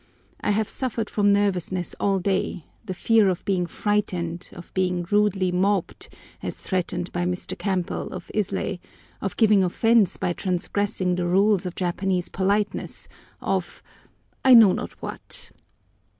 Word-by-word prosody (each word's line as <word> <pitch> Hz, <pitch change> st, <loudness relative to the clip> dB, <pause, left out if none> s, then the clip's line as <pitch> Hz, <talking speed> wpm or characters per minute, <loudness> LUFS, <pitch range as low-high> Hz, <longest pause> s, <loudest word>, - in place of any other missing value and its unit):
I -, -, -2 dB
have 210 Hz, +1 st, +1 dB
suffered 235 Hz, -4 st, -2 dB
from 205 Hz, -1 st, +3 dB
nervousness 185 Hz, -3 st, 0 dB
all 195 Hz, -1 st, +2 dB
day—the 190 Hz, +1 st, -3 dB
fear 220 Hz, +1 st, +4 dB
of 180 Hz, -, -3 dB
being 180 Hz, -3 st, +1 dB
frightened, 175 Hz, -3 st, -2 dB
of 175 Hz, -, -12 dB
being 180 Hz, -2 st, 0 dB
rudely 205 Hz, -3 st, +2 dB
mobbed, 190 Hz, +1 st, 0 dB, 0.3 s
as -, -, -4 dB
threatened 180 Hz, -1 st, -2 dB
by 175 Hz, -, -1 dB
Mr. 180 Hz, 0 st, -3 dB
Campbell 190 Hz, -4 st, -2 dB
of 185 Hz, -, -8 dB
Islay, 200 Hz, -2 st, -1 dB, 0.4 s
of 195 Hz, -, -3 dB
giving 210 Hz, -3 st, +5 dB
offence 220 Hz, +2 st, +3 dB
by 175 Hz, -, -1 dB
transgressing 185 Hz, +1 st, -1 dB
the 175 Hz, -1 st, 0 dB
rules 195 Hz, +1 st, +3 dB
of 180 Hz, -, -6 dB
Japanese 180 Hz, 0 st, -1 dB
politeness—of, 200 Hz, +2 st, -3 dB, 0.6 s
I 260 Hz, -1 st, +8 dB
know 220 Hz, -5 st, +9 dB
not -, -, -4 dB
what! -, -, -7 dB
190 Hz, 135 wpm, -24 LUFS, 180-205 Hz, 0.6 s, know